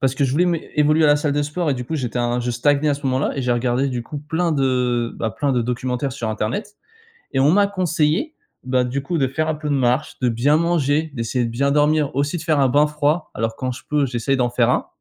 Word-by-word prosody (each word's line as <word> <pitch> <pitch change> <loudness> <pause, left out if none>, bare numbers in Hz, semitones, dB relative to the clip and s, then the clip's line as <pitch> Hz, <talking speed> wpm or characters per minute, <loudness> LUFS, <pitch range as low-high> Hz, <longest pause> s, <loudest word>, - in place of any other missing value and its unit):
parce 135 -1 +1
que 140 - -1
je 130 - 0
voulais 165 +6 +3
mé 170 -2 -2
évoluer 150 +1 +4
à - - +6
la 145 - +5
salle 145 0 -1
de 145 +1 0
sport 150 +2 -2
et 135 - +1
du 125 -1 -5
coup 160 +5 -3
j'étais 125 -3 -3
un 120 0 0
je 120 0 -2
stagnais 145 +4 +2
à 145 - +2
ce 140 +1 -11
moment-là 130 +3 0
et 135 - -2
j'ai 125 - -1
regardé 125 +3 0
du 125 -2 -3
coup 145 +4 -6
plein 160 +3 -1
de, 125 -4 0
bah, 110 - -2
plein 140 +8 -1
de 120 -2 +1
documentaires 125 +2 -2
sur 120 -4 -4
internet. 125 - -3 0.6
Et 135 - +1
on 140 - +5
m'a 200 +1 +4
conseillé, 180 - 0 0.3
bah, 125 0 +1
du 135 +3 -3
coup, 175 +5 -2
de 135 - +2
faire 155 +4 -2
un 160 - 0
peu 150 0 -5
de 145 - +1
marche, 130 +2 0
de 125 - +2
bien 125 +6 +2
manger, 160 -2 +1
d'essayer 120 +1 -1
de 115 - -2
bien 140 +5 0
dormir, 150 0 +2
aussi 145 +4 0
de - - -7
faire 155 -4 +1
un 135 - +4
bain 145 +4 +4
froid, 150 +2 -1
alors 115 0 -2
quand 130 -1 -3
je 125 - -10
peux 150 -1 +2
j'essaye 125 +2 -1
d'en 125 -2 +1
faire 120 0 +2
un, - - 0
140 Hz, 270 wpm, -21 LUFS, 125-150 Hz, 0.6 s, à